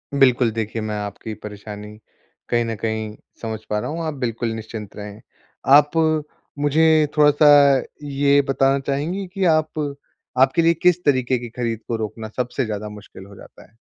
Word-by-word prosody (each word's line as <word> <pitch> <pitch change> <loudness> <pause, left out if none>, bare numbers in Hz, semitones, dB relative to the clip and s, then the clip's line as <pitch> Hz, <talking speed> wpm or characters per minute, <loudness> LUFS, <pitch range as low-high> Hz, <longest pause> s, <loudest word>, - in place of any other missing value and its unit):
बिल्कुल। 125 -3 +4
देखिये 110 0 -3
मैं 110 0 -3
आपकी 105 +2 -6
परेशानी 105 0 -9 0.5
कहीं 120 -1 +2
न 115 - -3
कहीं 110 0 -3 0.3
समझ 110 -1 -4
पा 105 - 0
रहा - - -4
हूँ 165 +3 -4
आप 155 - -2
बिल्कुल 115 -2 -2
निश्चिंत 110 -2 -8
रहें। 105 0 -9 0.5
आप 145 0 +5 0.7
मुझे 145 +2 +3 0.3
थोड़ा-सा 150 0 +5 0.6
ये 140 0 +3
बताना 135 0 +2
चाहेंगी 160 +8 -2
कि 195 -2 0
आप 155 -2 +1 0.6
आपके 135 +5 +4
लिए 165 0 +4
किस 180 +1 +2
तरीके 130 -3 +2
की 120 -1 -7
ख़रीद 115 -2 -3
को 115 - -1
रोकना 110 0 -5
सबसे 125 +1 -1
ज़्यादा 105 -1 -5
मुश्क़िल 105 -2 -12
हो 100 0 -14
जाता - - -15
है? 110 - -33
120 Hz, 165 wpm, -21 LUFS, 110-145 Hz, 0.7 s, आप